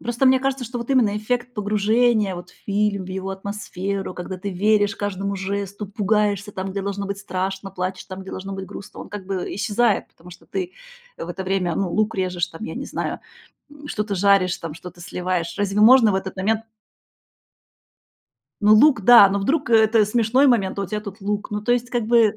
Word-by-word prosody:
Ну, - - -16
просто 240 +3 +1
мне 260 0 +5
кажется, 270 -1 -1
что 245 +1 -5
вот 235 +3 -6
именно 230 -6 +3
эффект 245 +3 -2
погружения 215 0 +2
вот 175 0 -9
в - - -23
фильм, 200 -1 0
в - - -10
его 190 +1 -4
атмосферу, 195 -1 -4
когда 180 +1 -6
ты 200 +2 -5
веришь 205 +2 +2
каждому 200 0 -3
жесту, 200 +1 -4
пугаешься 205 0 0
там, 190 0 -4
где 200 0 -3
должно 200 0 -3
быть 200 0 -4
страшно, 195 0 -4
плачешь 185 0 -4
там, 190 0 -8
где 190 - -9
должно 195 +1 -6
быть 190 0 -6
грустно, 195 - -10
он - - -9
как 200 -2 -8
бы, 190 -2 -2
э, - - -5
исчезает, 215 +4 +1
потому 175 +2 -16
что 175 - -14
ты 185 -2 -4 0.4
в 170 - -7
это 190 +2 -5
время, 185 -3 0
ну, 195 -2 0
лук 215 0 0
режешь 180 -2 -1
там, 165 +7 -9
я - - -6
не - - -5
знаю, - - -4 0.5
м, 290 0 -13
что-то 210 -7 -2
жаришь, 195 -1 +3
там, 160 -2 -6
что-то 175 +1 -11
сливаешь. 180 -1 -3
Разве 205 0 0
можно 230 0 +7
в - - +1
этот 190 0 -4
момент 215 +4 0 2.0
Ну, 210 0 +6
лук, 260 +1 +6
да, 235 -1 +9
но 200 +1 -1
вдруг, 270 +6 0
э, - - +5
это 220 -1 +4
смешной 235 +5 +3
момент, 205 -7 +2
а - - 0
у - - -3
тебя 210 +3 -3
тут 200 0 -9
лук. 205 +1 -3
Ну, 210 0 -3
то 240 - +2
есть, 245 0 -1
как 240 -3 -1
бы, 225 -2 +4
200 Hz, 215 wpm, -22 LUFS, 190-220 Hz, 2.0 s, да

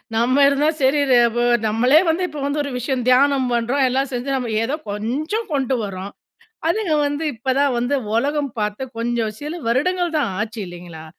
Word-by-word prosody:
நம்ம 255 +5 +3
இருந்தா 285 +2 +2
சரி 270 +3 +3
ர - - +6 0.2
வ 240 - 0 0.3
நம்மளே 250 +8 +4
வந்து 335 +3 +1
இப்ப 300 -2 -7
வந்து 290 +1 -1
ஒரு 280 - -5
விஷயம் 250 0 -2
தியானம் 270 0 +4
பண்றோம். 245 +4 +1
எல்லாம் 270 +2 0
செஞ்சு 245 +2 -3
நம்ம 250 -3 -2
ஏதோ 265 +6 -1 0.2
கொஞ்சம் 295 - -3
கொண்டு 265 -2 0
வரோம். 195 0 -6 0.6
அதுங்க 355 -3 0
வந்து 290 +2 -2
இப்ப 235 +4 -3
தான் 280 -3 +2
வந்து 245 +4 0 0.2
உலகம் 285 +3 0
பாத்து, 210 +3 -2 0.2
கொஞ்சம் 230 -2 -1
சில 305 +4 -5
வருடங்கள் 345 +8 0
தான் 235 -9 0
ஆச்சு, 225 +1 -4
இல்லைங்களா? 175 -2 -10
260 Hz, 175 wpm, -20 LUFS, 230-290 Hz, 0.6 s, ர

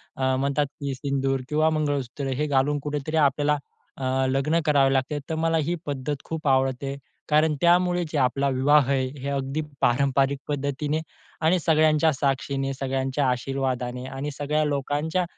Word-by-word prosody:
अ, 130 0 +1
म्हणतात, 140 +2 +1
की 140 -2 -3
सिंदूर 135 0 -1
किंवा 155 +1 +3
मंगळसूत्र 145 -3 -2
हे 150 - 0
घालून 145 +1 +1
कुठे 150 0 -2
तरी 160 +1 -1
आपल्याला 145 0 +3 0.4
अ, 135 - -6 0.3
लग्न 140 +5 +1
करावं 140 -3 +4
लागते. 135 +2 0
तर 160 - -1
मला 165 0 +2
ही 175 - 0
पद्धत 140 0 -3
खूप 160 -2 -4
आवडते, 135 0 +1 0.3
कारण 155 0 +3
त्यामुळे 175 +1 +3
जे 155 - -1
आपला 135 +2 +1
विवाह 135 +1 +3
आहे, 130 -1 +1
हे 140 +2 -4
अगदी 140 +2 -2 0.2
पारंपरिक 135 +2 +2
पद्धतीने 145 +2 -2 0.4
आणि 165 +3 +3
सगळ्यांच्या 155 -1 +3
साक्षीने, 135 0 -1
सगळ्यांच्या 135 0 -1
आशीर्वादाने 125 -1 -2
आणि 135 +2 -5
सगळ्या 150 +1 +1
लोकांच्या 150 +5 -1
140 Hz, 150 wpm, -25 LUFS, 135-150 Hz, 0.4 s, करावं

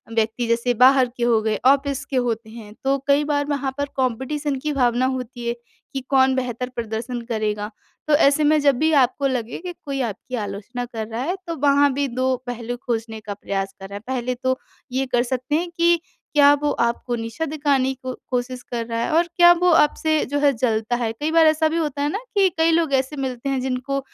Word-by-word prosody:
व्यक्ति, 225 +1 0
जैसे 235 +1 +1
बाहर 255 0 +6
के 240 - -2
हो 230 -2 +3
गए, 215 -1 0
ऑफ़िस 280 +1 +3
के 275 - -6
होते 230 -3 -1
हैं। 220 -2 -11
तो 275 +1 +3
कई 285 +1 +4
बार 290 -1 0
वहाँ 280 -2 -1
पर 285 - 0
कॉम्पिटिशन 265 +4 -1
की 300 - 0
भावना 245 -1 +2
होती 245 -1 -7
है 235 - +1 0.4
कि 270 - -2
कौन 265 -1 +4
बेहतर 250 -1 -3
प्रदर्शन 235 +2 -4
करेगा। 210 -1 -1 0.4
तो - - +4
ऐसे 290 0 +4
में 300 +1 +4
जब 280 -2 +4
भी 315 +1 +3
आपको 275 +3 -2
लगे 245 -3 -3
कि 355 - -4
कोई 275 -1 -2
आपकी 250 +5 -8
आलोचना 210 +5 -5
कर 225 -2 -6
रहा 225 +2 -4
है, 355 +6 -1
तो 335 - -3
वहाँ 285 -1 +4
भी 280 +1 0
2 255 +1 0
पहलू 245 0 -4
खोजने 225 -2 -3
का 205 -1 -5
प्रयास 195 -1 -4
करें। 200 +1 -7
पहले 250 +1 -3
तो 260 +1 -1 0.3
ये 265 +2 0
कर 240 0 +4
सकते 255 +3 -2
हैं 345 +2 -1
कि 340 0 +4 0.4
क्या 285 0 +7
वो 295 - +1
आपको 235 +1 -1
नीचा 230 +6 -4
दिखाने 280 -3 +1
की 255 0 -6 0.2
कोशिश 250 0 -2
कर 235 -1 -2
रहा 230 0 -2
है - - -2
और 340 +1 +3
क्या 345 0 +8
वो 360 - +4
आपसे 310 0 +3
जो 285 +2 -2
है, 285 -1 +4
जलता 225 -1 0
है? 230 -2 -1
कई 295 +7 -3
बार 325 0 +5
ऐसा 315 0 +3
भी 325 - -1
होता 295 -4 -2
है 290 - +1
ना 410 - -2 0.2
कि 390 -1 +6
कई 325 +1 +4
लोग 325 -3 +1
ऐसे 265 +2 +1
मिलते 265 -1 -3
हैं, 270 -1 0
जिनको 265 +2 -2
260 Hz, 215 wpm, -22 LUFS, 235-285 Hz, 0.4 s, क्या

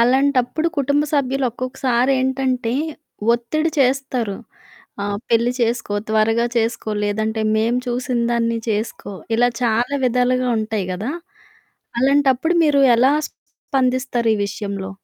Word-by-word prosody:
అలాంటప్పుడు 265 +4 +2
కుటుంబ 285 +2 +2
సభ్యులు 270 -2 +1
ఒక్కొక్కసారి 255 +1 0
ఏంటంటే 260 -2 0 0.6
ఒత్తిడి 310 +8 -1
చేస్తారు. 255 -5 0 0.7
ఆహ్, 200 0 -2
"పెళ్లి 235 +1 +3
చేసుకో, 235 -2 0
త్వరగా 220 +2 +2
చేసుకో 230 -1 -1
లేదంటే 220 +2 -1 0.2
మేము 230 +3 +1
చూసినదాన్ని 235 -1 0
చేసుకో" 215 -1 -3 0.2
ఇలా 245 +1 +4
చాలా 240 +4 +1
విధాలుగా 250 +1 +1
ఉంటాయి 215 -3 -2
గదా! 210 +9 -3 0.9
అలాంటప్పుడు 275 +4 +3
మీరు 290 -2 +3 0.2
ఎలా 260 +4 +4 0.2
స్పందిస్తారు 255 -3 -1
ఈ - - -4
విషయంలో? 200 -1 -5
245 Hz, 110 wpm, -20 LUFS, 225-265 Hz, 0.9 s, ఇలా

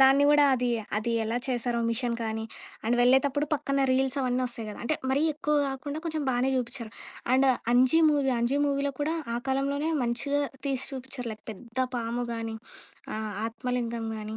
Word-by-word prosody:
దాన్ని 270 +2 +7
గూడా 295 0 +6
అది 250 0 0 0.3
అది 230 +2 -1
ఎలా 225 +2 -1
చేశారో 245 -2 0
మిషన్ 235 0 0
కానీ, 220 0 -2 0.4
అండ్ 240 +2 +2
వెళ్ళేతప్పుడు 265 +4 +4
పక్కన 275 -1 0
రీల్స్ 265 +1 +1
అవన్నొస్తాయి 250 -3 -1
గదా! 210 - -7
అంటే 310 - +1 0.2
మరీ 280 +3 +2
ఎక్కువ 300 0 0
కాకుండా 285 +3 -4
కొంచెం 315 -2 -2
బానే 250 +2 +1
జూపించారు. 235 -2 -3 0.4
అండ్ 270 +1 +4 0.3
'అంజి' 255 +6 +5
మూవీ 275 -3 +2
అంజి 260 +4 +1
మూవీలో 280 0 0
కూడా 315 +3 +1 0.2
ఆ - - 0
కాలంలోనే 280 +3 0
మంచిగా 265 +5 0 0.3
తీసి 265 -2 0
చూపించారు 260 -2 -5
లైక్ 215 - -12
పెద్ద 235 +4 -10 0.2
పాము 235 +1 -2
గానీ, 225 -1 -4 0.6
ఆహ్, 215 -1 -3
ఆత్మలింగం 235 -1 -3
గానీ, 215 +1 -5
255 Hz, 165 wpm, -28 LUFS, 235-275 Hz, 0.6 s, దాన్ని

